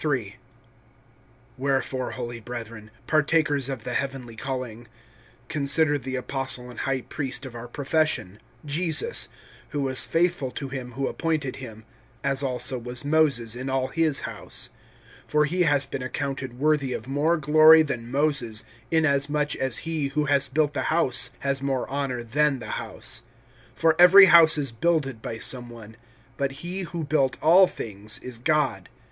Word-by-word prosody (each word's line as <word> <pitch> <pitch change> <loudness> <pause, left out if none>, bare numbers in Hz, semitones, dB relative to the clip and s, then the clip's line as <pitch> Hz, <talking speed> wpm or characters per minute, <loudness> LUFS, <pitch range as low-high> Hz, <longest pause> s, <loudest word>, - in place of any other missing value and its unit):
WHEREFORE, 130 -1 -1
holy 120 -2 -6
brethren, 115 -2 -8 0.2
partakers 155 -3 +2
of 130 -5 -5
the 125 - -5
heavenly 135 -4 -4
calling, 120 -2 -6 0.6
consider 145 +1 +2
the 130 0 -5
Apostle 130 -1 -3
and - - -10
High 135 -1 -1
Priest 135 0 -5
of 130 - -9
our 120 0 -8
profession, 145 - -1 0.3
Jesus, 165 - +2 0.4
(2)who 145 - -2
was 130 -1 +4
faithful 170 -5 0
to 140 -1 -5
him 125 -2 -6
who 135 +2 -2
appointed 155 -6 -2
him, 110 -4 -10 0.4
as 135 0 0
also 130 -1 0
was 125 +3 -5
Moses 145 -7 +2
in 130 +2 -5
all 130 0 -1
His 160 -1 +1
house. - - -6 0.6
(3)For 150 0 +3
he 180 +4 0
has 145 -3 +2
been 135 - -6
accounted 130 -1 -4
worthy 145 -2 +1
of 115 - -6
more 150 +5 +1
glory 155 +2 +7
than 120 -6 -5
Moses, 135 -5 0 0.3
inasmuch 150 -2 +1
as 130 -3 0
he 160 -3 -2
who 150 +2 -1
has 140 -1 +3
built 145 +2 0
the - - -2
house 125 -7 +2
has 140 -1 -1
more 135 -2 -2
honor 135 -3 -3
than 145 +4 +1
the 110 -4 -5
house. - - -4 0.6
(4)For 165 -1 +4
every 185 +3 +9
house 170 -3 +7
is 140 -4 0
builded 135 -1 -1
by 110 - -5
some 120 +1 -3
one; 110 -2 -12 0.4
but 140 -1 -1
he 180 +2 -4
who 170 -1 -4
built 140 -3 0
all 180 +4 +6
things 105 - -6
is 125 -2 -8
God. 150 +2 0
135 Hz, 155 wpm, -25 LUFS, 125-150 Hz, 0.6 s, every